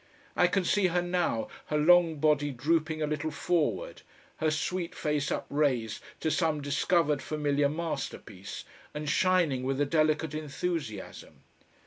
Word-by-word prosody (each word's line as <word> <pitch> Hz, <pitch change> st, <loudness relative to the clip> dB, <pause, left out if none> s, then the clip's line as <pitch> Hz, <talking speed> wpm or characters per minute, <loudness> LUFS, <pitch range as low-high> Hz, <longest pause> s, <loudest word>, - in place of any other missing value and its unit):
I 180 Hz, -, +5 dB
can 185 Hz, +1 st, 0 dB
see 200 Hz, +1 st, +3 dB
her 175 Hz, 0 st, +1 dB
now, 175 Hz, -10 st, 0 dB, 0.2 s
her 150 Hz, -, 0 dB
long 165 Hz, +1 st, +5 dB
body 150 Hz, -1 st, +2 dB
drooping 155 Hz, +4 st, 0 dB
a -, -, +2 dB
little 150 Hz, +1 st, -2 dB
forward, 150 Hz, -, -1 dB, 0.4 s
her 155 Hz, -, +1 dB
sweet 170 Hz, +3 st, -2 dB
face 150 Hz, -2 st, -1 dB
upraised 130 Hz, -7 st, 0 dB, 0.2 s
to 160 Hz, -, 0 dB
some 160 Hz, -3 st, +1 dB
discovered 145 Hz, +1 st, +1 dB
familiar 145 Hz, -2 st, 0 dB
masterpiece 135 Hz, -, -5 dB, 0.3 s
and 150 Hz, 0 st, -4 dB
shining 170 Hz, -4 st, +2 dB
with 135 Hz, +1 st, -1 dB
a 145 Hz, -, +3 dB
delicate 155 Hz, 0 st, +1 dB
enthusiasm. 155 Hz, -, -5 dB
155 Hz, 135 wpm, -29 LUFS, 140-170 Hz, 0.4 s, I